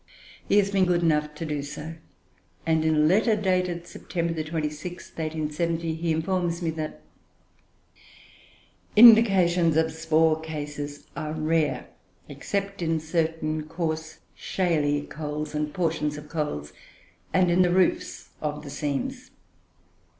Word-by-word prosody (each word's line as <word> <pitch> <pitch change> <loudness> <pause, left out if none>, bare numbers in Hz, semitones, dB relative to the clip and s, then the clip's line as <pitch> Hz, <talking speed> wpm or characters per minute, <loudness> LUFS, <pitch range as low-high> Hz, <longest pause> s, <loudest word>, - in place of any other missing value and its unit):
He 205 - +4
has 200 -1 +3
been 195 -2 +3
good 175 -1 +1
enough 150 -2 +1
to 165 - -5
do 150 -2 -2
so; 150 +3 -7 0.7
and 160 -1 +2
in 160 0 +2
a 150 0 +4
letter 215 +7 +4
dated 180 -4 0
September 170 -1 -3
26th, 155 -1 -3
1870, 165 -1 -3
he 165 +1 -1
informs 175 +1 -1
me 165 - 0
that 155 -1 -5 1.9
"Indications 190 -8 +7
of 160 0 +2
spore 160 0 +2
cases 145 -2 -6
are 155 0 -4
rare, 155 -1 0 0.4
except 200 -1 -4
in 165 -1 +1
certain 160 -1 -1
coarse 160 -1 -3 0.2
shaly 150 -6 0
coals 150 0 -5
and 150 0 -2
portions 160 -4 -1
of 150 0 -10
coals, 110 - -3 0.6
and 180 0 +3
in 180 +2 +4
the 180 - +4
roofs 185 0 +1
of 150 0 -3
the 145 - -8
seams. 255 - -3
160 Hz, 130 wpm, -26 LUFS, 150-175 Hz, 1.9 s, Indications